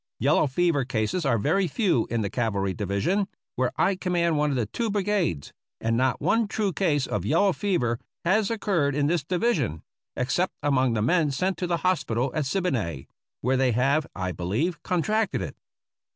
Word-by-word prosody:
Yellow 145 Hz, +3 st, +3 dB
fever 150 Hz, 0 st, +1 dB
cases 125 Hz, +7 st, -1 dB
are 120 Hz, -4 st, +3 dB
very 190 Hz, -, +1 dB
few 170 Hz, -, +1 dB
in 115 Hz, 0 st, 0 dB
the 100 Hz, -, -1 dB
cavalry 100 Hz, -5 st, -1 dB
division, 105 Hz, -, 0 dB, 0.3 s
where 125 Hz, 0 st, 0 dB
I 195 Hz, -, +3 dB
command 175 Hz, -3 st, 0 dB
one 150 Hz, 0 st, +2 dB
of 140 Hz, -, -1 dB
the 120 Hz, -3 st, 0 dB
two 230 Hz, -, -3 dB
brigades, 200 Hz, -, -1 dB, 0.3 s
and 115 Hz, 0 st, 0 dB
not 130 Hz, +1 st, +1 dB
one 225 Hz, -1 st, +2 dB
true 205 Hz, -2 st, -1 dB
case 150 Hz, -8 st, +1 dB
of 100 Hz, -, -2 dB
yellow 175 Hz, -, +3 dB
fever 125 Hz, -, 0 dB, 0.3 s
has 195 Hz, +3 st, +3 dB
occurred 185 Hz, -, 0 dB
in 145 Hz, -1 st, +1 dB
this 160 Hz, 0 st, +1 dB
division, 160 Hz, -, 0 dB, 0.3 s
except 130 Hz, +9 st, 0 dB
among 130 Hz, -4 st, +2 dB
the 105 Hz, -2 st, 0 dB
men 160 Hz, +4 st, +3 dB
sent 180 Hz, +8 st, 0 dB
to 180 Hz, -, -1 dB
the 170 Hz, -1 st, +1 dB
hospital 135 Hz, -8 st, +1 dB
at 155 Hz, -3 st, -1 dB
Siboney, 120 Hz, -, -2 dB, 0.3 s
where 130 Hz, +2 st, +1 dB
they 130 Hz, -2 st, +2 dB
have, 140 Hz, +6 st, +2 dB
I 95 Hz, -1 st, -2 dB
believe, 120 Hz, -, -2 dB
contracted 210 Hz, +5 st, 0 dB
it. -, -, -6 dB
145 Hz, 180 wpm, -26 LUFS, 120-185 Hz, 0.3 s, Yellow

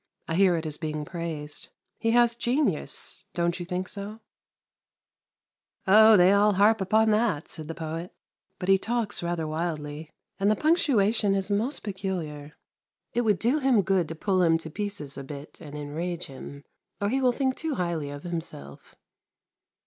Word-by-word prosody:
I -, -, -2 dB
hear 185 Hz, 0 st, +4 dB
it 160 Hz, -, -4 dB
is 150 Hz, -1 st, -4 dB
being 155 Hz, -2 st, -4 dB
praised. 160 Hz, -4 st, -4 dB, 0.3 s
He 225 Hz, -, 0 dB
has 240 Hz, 0 st, +4 dB
genius, 250 Hz, +5 st, -1 dB
don't 170 Hz, 0 st, 0 dB
you 175 Hz, -, -6 dB
think 180 Hz, 0 st, -2 dB
so? 205 Hz, +3 st, -6 dB, 0.9 s
' -, -, -46 dB
Oh, 215 Hz, +2 st, +8 dB
they 180 Hz, +2 st, +6 dB
all 205 Hz, +1 st, +4 dB
harp 205 Hz, +3 st, +4 dB
upon 220 Hz, +3 st, +3 dB
that,' 210 Hz, -8 st, +1 dB
said 155 Hz, -2 st, -7 dB
the 165 Hz, -, -5 dB
poet; 165 Hz, +1 st, -5 dB, 0.2 s
' 190 Hz, -, -53 dB
but 180 Hz, -, -5 dB
he 195 Hz, 0 st, +5 dB
talks 230 Hz, -1 st, -1 dB
rather 170 Hz, -2 st, -2 dB
wildly! 155 Hz, -1 st, -4 dB, 0.3 s
And 200 Hz, +1 st, +3 dB
the 215 Hz, -, +4 dB
punctuation 225 Hz, -, +2 dB
is 195 Hz, +1 st, -1 dB
most 225 Hz, +8 st, 0 dB
peculiar.' 175 Hz, -7 st, -4 dB, 0.2 s
". -, -, -66 dB
' -, -, -58 dB
It 240 Hz, -, +2 dB
would 215 Hz, -4 st, +2 dB
do 245 Hz, -, +1 dB
him 260 Hz, -7 st, +3 dB
good 185 Hz, -2 st, +1 dB
to 165 Hz, -, -6 dB
pull 185 Hz, +2 st, +1 dB
him 165 Hz, -2 st, +4 dB
to 160 Hz, -1 st, -9 dB
pieces 200 Hz, -8 st, -4 dB
a -, -, -6 dB
bit 140 Hz, +2 st, -9 dB
and 150 Hz, -2 st, -8 dB
enrage 165 Hz, +4 st, -4 dB
him, 140 Hz, +1 st, -10 dB, 0.4 s
or 205 Hz, -, 0 dB
he 265 Hz, +4 st, 0 dB
will 255 Hz, -1 st, +4 dB
think 260 Hz, +1 st, 0 dB
too 315 Hz, -3 st, -3 dB
highly 170 Hz, -5 st, -2 dB
of 145 Hz, 0 st, -8 dB
himself 160 Hz, -, -7 dB
185 Hz, 180 wpm, -27 LUFS, 160-215 Hz, 0.9 s, Oh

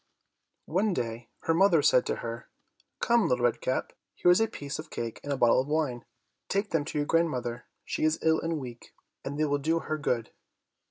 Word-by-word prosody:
One 190 Hz, +3 st, +1 dB
day 115 Hz, -1 st, -4 dB
her 165 Hz, -, +1 dB
mother 170 Hz, -3 st, +4 dB
said 130 Hz, -4 st, +4 dB
to -, -, 0 dB
her, 115 Hz, 0 st, -6 dB, 0.5 s
"Come, 235 Hz, -2 st, +3 dB
Little 125 Hz, -1 st, +2 dB
Red 120 Hz, -, +1 dB
Cap, 130 Hz, -, -1 dB, 0.2 s
here 175 Hz, -, +4 dB
is 180 Hz, -, +5 dB
a 225 Hz, -, +3 dB
piece 145 Hz, -10 st, -6 dB
of 155 Hz, -, -8 dB
cake 115 Hz, -1 st, -5 dB
and 145 Hz, -, -4 dB
a 140 Hz, -, 0 dB
bottle 120 Hz, 0 st, +5 dB
of 135 Hz, -, -6 dB
wine; 145 Hz, -7 st, -1 dB, 0.4 s
take 200 Hz, +1 st, 0 dB
them 165 Hz, -3 st, +1 dB
to -, -, -4 dB
your 145 Hz, -, +1 dB
grandmother, 125 Hz, -8 st, 0 dB, 0.2 s
she -, -, -3 dB
is 155 Hz, 0 st, +3 dB
ill 160 Hz, 0 st, +4 dB
and 165 Hz, -1 st, -1 dB
weak, 120 Hz, -3 st, -10 dB, 0.3 s
and 140 Hz, +1 st, -4 dB
they 155 Hz, -, +2 dB
will 145 Hz, -1 st, 0 dB
do 160 Hz, +4 st, +1 dB
her 155 Hz, -1 st, -3 dB
good. 120 Hz, -6 st, -1 dB
145 Hz, 210 wpm, -28 LUFS, 125-165 Hz, 0.5 s, is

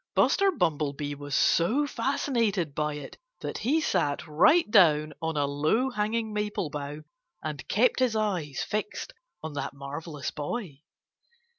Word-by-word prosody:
Buster 395 Hz, 0 st, +4 dB
Bumblebee 145 Hz, -, -1 dB
was 145 Hz, 0 st, -5 dB
so 235 Hz, -, +3 dB
fascinated 230 Hz, -, 0 dB
by 150 Hz, 0 st, -1 dB
it 145 Hz, -, -9 dB, 0.2 s
that -, -, -4 dB
he 290 Hz, +7 st, +2 dB
sat 145 Hz, -, 0 dB
right 235 Hz, -, +5 dB
down 155 Hz, -5 st, +5 dB
on 160 Hz, -1 st, -2 dB
a 145 Hz, -, +2 dB
low 155 Hz, -, +1 dB
hanging 220 Hz, 0 st, -1 dB
maple 210 Hz, -6 st, -2 dB
bough 145 Hz, +1 st, -5 dB, 0.4 s
and 150 Hz, -4 st, -5 dB
kept 240 Hz, +6 st, +3 dB
his 250 Hz, -3 st, +2 dB
eyes 180 Hz, -10 st, -1 dB
fixed 215 Hz, -, -3 dB, 0.3 s
on 160 Hz, -1 st, -5 dB
that 145 Hz, -, -4 dB
marvellous 145 Hz, +2 st, -5 dB
boy. 150 Hz, -, -5 dB
160 Hz, 140 wpm, -28 LUFS, 145-225 Hz, 0.4 s, right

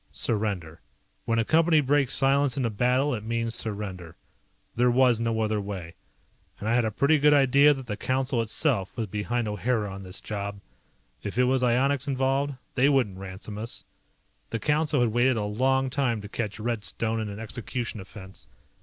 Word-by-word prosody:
Surrender. 100 Hz, -8 st, -2 dB, 0.4 s
When 115 Hz, -, +1 dB
a 115 Hz, -, +2 dB
Company 160 Hz, +2 st, +4 dB
breaks 140 Hz, -1 st, +2 dB
silence 140 Hz, 0 st, +2 dB
in 130 Hz, -, 0 dB
a 115 Hz, -, 0 dB
battle 125 Hz, +6 st, +1 dB
it 110 Hz, -3 st, -4 dB
means 115 Hz, 0 st, -2 dB
surrender. 95 Hz, -7 st, -4 dB, 0.6 s
There 125 Hz, +1 st, +3 dB
was 125 Hz, -2 st, +4 dB
no 115 Hz, -1 st, 0 dB
other 110 Hz, -1 st, 0 dB
way. 95 Hz, -4 st, -6 dB, 0.7 s
And 105 Hz, -, -5 dB
I 115 Hz, -, +2 dB
had 120 Hz, -1 st, +3 dB
a -, -, +1 dB
pretty 140 Hz, +8 st, +2 dB
good 150 Hz, +1 st, +5 dB
idea 140 Hz, +2 st, +5 dB
that 135 Hz, -1 st, -8 dB
the 105 Hz, -3 st, -4 dB
Council 130 Hz, +1 st, 0 dB
itself 115 Hz, -, +1 dB
was 115 Hz, -, -1 dB
behind 110 Hz, +3 st, -2 dB
O'Hara 105 Hz, 0 st, -1 dB
on 95 Hz, -, -8 dB
this 95 Hz, 0 st, -7 dB
job. 100 Hz, -1 st, -5 dB, 0.6 s
If 105 Hz, +2 st, -6 dB
it 125 Hz, -, +5 dB
was 130 Hz, +1 st, +2 dB
ionics 130 Hz, +3 st, +2 dB
involved, 135 Hz, +1 st, 0 dB, 0.2 s
they 135 Hz, +2 st, +3 dB
wouldn't 120 Hz, -10 st, +1 dB
ransom 95 Hz, +2 st, -7 dB
us. 115 Hz, +2 st, -4 dB, 0.7 s
The -, -, -2 dB
Council 150 Hz, +2 st, +1 dB
had 120 Hz, -2 st, +2 dB
waited 120 Hz, +2 st, +3 dB
a 105 Hz, -, -1 dB
long 130 Hz, +5 st, +1 dB
time 130 Hz, -4 st, 0 dB
to 105 Hz, -, -8 dB
catch 110 Hz, 0 st, -4 dB
Red 115 Hz, -1 st, -2 dB
Stone 110 Hz, +5 st, -2 dB
in 110 Hz, -1 st, -3 dB
an 100 Hz, +1 st, -7 dB
execution 115 Hz, 0 st, -4 dB
offense. 95 Hz, 0 st, -11 dB
115 Hz, 185 wpm, -26 LUFS, 105-135 Hz, 0.7 s, good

